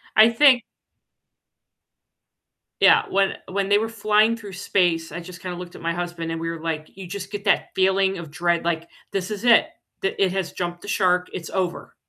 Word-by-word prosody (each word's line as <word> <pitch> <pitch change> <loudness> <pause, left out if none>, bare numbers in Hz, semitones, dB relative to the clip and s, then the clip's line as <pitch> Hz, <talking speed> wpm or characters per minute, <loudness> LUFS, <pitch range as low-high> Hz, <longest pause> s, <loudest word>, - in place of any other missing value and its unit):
I 220 +1 +8
think 245 0 +5 2.2
Yeah, - - +6
when 195 0 +2
when 195 +1 -2
they 205 +1 +5
were 225 +1 -2
flying 215 +1 +2
through 205 -4 -10
space, 175 -3 0
I 170 - -5
just 175 0 -11
kinda 180 -1 -5
looked 180 -1 -9
at - - -11
my 170 0 -1
husband, 175 -1 -4
and 165 - -3
we 165 0 -3
were 165 -1 -6
like, 160 -1 -4
you 190 -2 -9
just 195 +3 -7
get 205 0 -6
that 200 - +2
feeling 190 0 +2
of 165 -3 -8
dread, 175 +1 0
like 170 0 -1 0.2
this 195 +1 -3
is 205 0 -5
it 245 +6 +6 0.3
the 195 - -2
it 185 - +2
has 190 -3 -2
jumped 175 -1 -4
the - - -10
shark, 180 -2 +2
it's 165 -3 -6
over 185 -2 -3
185 Hz, 200 wpm, -23 LUFS, 175-200 Hz, 2.2 s, I